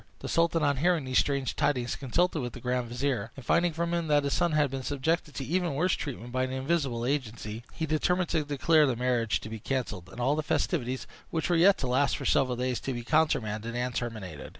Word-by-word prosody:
The - - -7
sultan, 165 -1 +2
on 140 -2 +2
hearing 165 0 +2
these 130 0 +3
strange 140 -3 0
tidings, 125 -4 0
consulted 160 +5 0
with 120 -2 -4
the - - -8
grand 125 0 -1
vizier; 120 -3 -1
and 135 - -10
finding 170 0 +3
from 170 +2 -2
him 170 -1 0
that 145 -1 +3
his 140 - 0
son 175 -2 +1
had 150 -3 +2
been 135 -1 -3
subjected 150 +3 -1
to 135 - -4
even 175 -1 0
worse 175 +5 +2
treatment 125 -4 -5
by 130 +1 0
an 130 0 -1
invisible 130 -3 -1
agency, 115 -5 -3
he 160 - -3
determined 175 +3 +1
to 160 -2 +1
declare 150 +2 +3
the 130 - 0
marriage 120 -2 +1
to - - -7
be 110 0 -6
cancelled, 105 -8 -3
and - - -11
all 135 +4 +2
the 155 - 0
festivities, 130 -4 -1 0.2
which 160 +1 -1
were - - +4
yet 190 +4 +6
to - - -4
last 130 +3 +2
for - - -6
several 130 -3 +2
days, 125 0 -1
to 135 - -3
be 120 -1 -5
countermanded 115 -7 +1
and 125 0 -1
terminated. 110 - -5
135 Hz, 230 wpm, -29 LUFS, 120-160 Hz, 0.2 s, yet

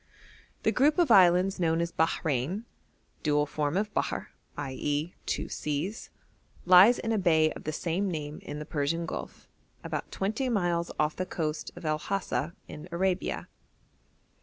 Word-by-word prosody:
The - - +3
group 290 +5 +3
of 340 -8 +3
islands 185 0 +5
known 165 -1 +2
as 170 0 -1
Bahrein 160 - 0 0.6
(dual 150 -1 +2
form 150 +2 -1
of 210 +1 -1
Bahr, - - -2 0.3
i.e. 145 +3 -2
two - - -1
seas) 155 +9 -3 0.6
lies 185 +7 +8
in 225 - -2
a 220 - +2
bay 160 -4 +4
of - - -9
the 155 - -1
same 175 +5 -1
name 150 -3 -4
in 145 - -7
the 150 - -6
Persian 160 +3 -1
Gulf, - - -7 0.4
about - - -4
twenty 220 +7 -1
miles 175 -6 0
off 155 0 +1
the 185 - -3
coast 155 -3 -3
of 175 -1 -10
El 155 0 0
Hasa 175 -3 -2
in 155 +4 -9
Arabia. 185 +2 -1
170 Hz, 155 wpm, -29 LUFS, 150-190 Hz, 0.6 s, lies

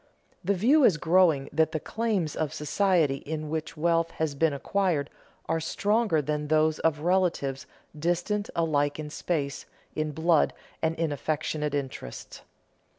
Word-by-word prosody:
The 200 +3 +1
view 265 - +4
is 185 -10 +5
growing 160 -4 +3
that 160 +1 +2
the 155 - 0
claims 210 -6 -1
of 155 -2 -1
the 155 - -9
society 155 -1 +2
in 155 +1 -5
which 160 +1 -4
wealth 165 +1 +2
has 160 -2 0
been 160 +3 +2
acquired 160 +1 -1 0.4
are 165 - 0
stronger 200 0 +1
than 150 +1 -2
those 155 0 +2
of 155 -2 +1
relatives 170 -6 0 0.3
distant 175 +7 -1
alike 145 -3 +1
in 150 -1 -6
space, 145 -4 -3 0.3
in 155 0 -1
blood, 160 +1 +2 0.3
and 160 0 +1
in 165 -2 -1
affectionate 150 0 -2
interest. 130 - -6
160 Hz, 150 wpm, -27 LUFS, 150-175 Hz, 0.4 s, is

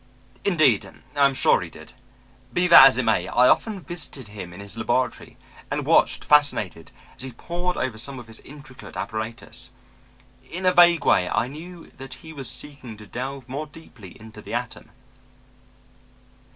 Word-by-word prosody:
Indeed 155 - +3 0.3
I 140 -1 +5
am 135 -1 +2
sure - - +4
he - - -6
did. - - -14 0.6
Be 180 +8 +1
that 170 -6 +10
as 135 - +2
it 130 - +1
may, 110 -6 +1
I 125 +5 +4
often 210 - +2
visited 155 - -7
him 100 -4 -8
in 90 - -11
his 100 +1 -6
laboratory 120 +3 -2 0.3
and - - -2
watched, - - +3
fascinated, 125 - +2 0.3
as - - -9
he 130 0 -5
pored 175 +7 -3
over 115 -4 -2
some 135 +4 -5
of 120 - -9
his 115 0 -4
intricate 140 -2 -12
apparatus. 110 +1 -5 0.8
In 185 +3 -5
a 185 - +4
vague 175 -1 +6
way, 90 -1 +3
I - - 0
knew 165 +5 -11
that 135 -1 -8
he 160 +4 -12
was 135 -5 -7
seeking 130 -5 -7
to 105 - -12
delve 130 +4 -6
more 145 +4 -5
deeply 120 - -14
into 110 -1 -12
the 115 - -6
atom. 120 0 -5
130 Hz, 170 wpm, -24 LUFS, 110-155 Hz, 0.8 s, that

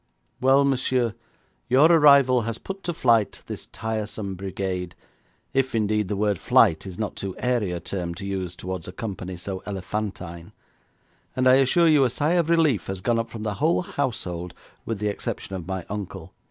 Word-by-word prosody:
'Well, 135 +2 +5
monsieur, 130 -3 +1 0.6
your 140 +7 +6
arrival 140 -6 +6
has 115 0 -3
put 195 0 -7
to 175 - 0
flight 115 -6 +2
this - - -7
tiresome 110 -2 -4
brigade, 95 -1 -4 0.6
if, 135 -2 +1
indeed, 105 -2 +1
the 105 - -2
word 100 -2 0
flight 80 +3 +4
is 90 -2 -8
not 110 -2 -3
too 95 -2 -5
airy 120 -7 0
a 90 - -3
term 85 -1 -4
to 100 +3 -7
use 95 -3 -3
towards 90 -2 -5
a - - -6
company 95 -4 -5
so 95 +1 -5
elephantine, 95 -4 -5 0.8
and 130 0 +2
I 130 +1 +7
assure 135 +6 +4
you 150 -3 +5
a 130 - +3
sigh 145 +6 0
of 170 -2 +2
relief 160 - +3
has 95 -1 -4
gone 115 +3 +1
up 115 0 -3
from 115 -2 -7
the 105 -1 -1
whole 165 +4 +3
household 110 - -3 0.3
with 115 - -2
the 105 +1 -2
exception 100 -1 -4
of 90 -2 -6
my 95 -2 -4
uncle. 105 -1 -6
105 Hz, 180 wpm, -24 LUFS, 95-130 Hz, 0.8 s, I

